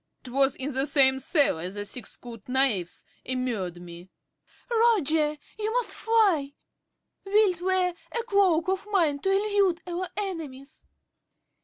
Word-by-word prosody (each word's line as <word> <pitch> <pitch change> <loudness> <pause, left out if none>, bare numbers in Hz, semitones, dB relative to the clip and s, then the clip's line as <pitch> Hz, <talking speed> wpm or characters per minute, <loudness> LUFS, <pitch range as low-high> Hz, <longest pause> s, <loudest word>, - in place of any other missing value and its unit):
'Twas 270 +1 +1
in 270 +2 -3
that 265 +1 -1
same 265 -2 +4
cellar 265 - +1
the 205 +2 -6
thick 240 +4 -6
skulled 235 -2 -10
knaves 250 -10 0 0.2
immured 230 -9 -3
me. 175 +1 -11 0.6
~Dorothy.~ 465 -2 +2 0.3
Roger, 300 -1 +1 0.2
you 430 +1 -1
must - - -1
fly! 390 -12 +2 0.7
Wilt 390 -3 +2
wear 370 -1 +1 0.2
a 470 - -2
cloak 385 -7 +2
of 380 +2 -1
mine 330 -8 +2
to 385 - -1
elude 395 -3 +1
our 360 +1 -4
enemies? 315 -9 -6
300 Hz, 135 wpm, -26 LUFS, 255-390 Hz, 0.7 s, same